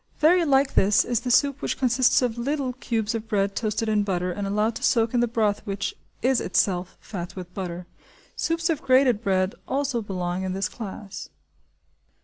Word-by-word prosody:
Very 340 +3 +4
like 275 -1 +3
this, 200 +1 +4
is 240 -2 0
the 250 +1 -4
soup 280 +2 +3
which - - -2
consists 255 0 +3
of 240 -3 0
little 265 +1 -2
cubes 230 -3 -2
of 225 -1 -4
bread 200 -2 0
toasted 220 0 -1
in 215 -1 +2
butter 180 -3 -1
and 200 +2 -3
allowed 210 +3 +1
to - - -10
soak 230 -1 +2
in 245 - +2
the 240 - +3
broth 220 -3 0
which 200 -2 -3 0.3
is 260 0 +3
itself 180 -1 0
fat 175 -5 -7
with 180 -1 -8
butter. 180 -2 -5 0.5
Soups 335 +1 0
of 310 - -2
grated 255 -4 +4
bread 190 -3 +1
also 270 -3 -1
belong 180 -3 -3
in 190 -1 -2
this 190 0 -1
class. 205 -2 -8
220 Hz, 185 wpm, -25 LUFS, 195-255 Hz, 0.5 s, Very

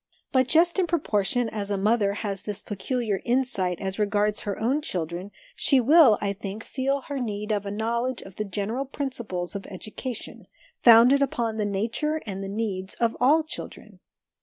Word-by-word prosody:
* - - -46
But 260 -1 +4
just 340 +6 +3
in 365 - +2
proportion 245 - 0
as 210 -2 -4
a 200 - 0
mother 205 0 +2
has 200 -2 -3
this 210 0 -4
peculiar 210 0 -2
insight 240 -8 0
as 190 +1 -4
regards 210 0 +1
her 200 -2 -4
own 260 +7 +1
children, 175 - -4 0.3
she 275 - +4
will, 265 -3 +6
I 200 -1 -1
think, 200 +2 -7
feel 275 +1 -1
her 280 0 -5
need 210 -3 -3
of 205 -1 -1
a - - -3
knowledge 235 +4 -2
of 190 -1 -13
the 215 - -1
general 210 +7 -2
principles 235 -11 -4
of 200 - -5
education, 215 +5 -7 0.3
founded 240 +4 +7
upon 235 -5 0
the 210 - 0
nature 225 +10 -1
and 195 -2 -5
the 195 - -5
needs 200 -3 -2
of 230 -1 0
all 300 +6 +5
children. 310 - -9
220 Hz, 180 wpm, -26 LUFS, 200-260 Hz, 0.3 s, founded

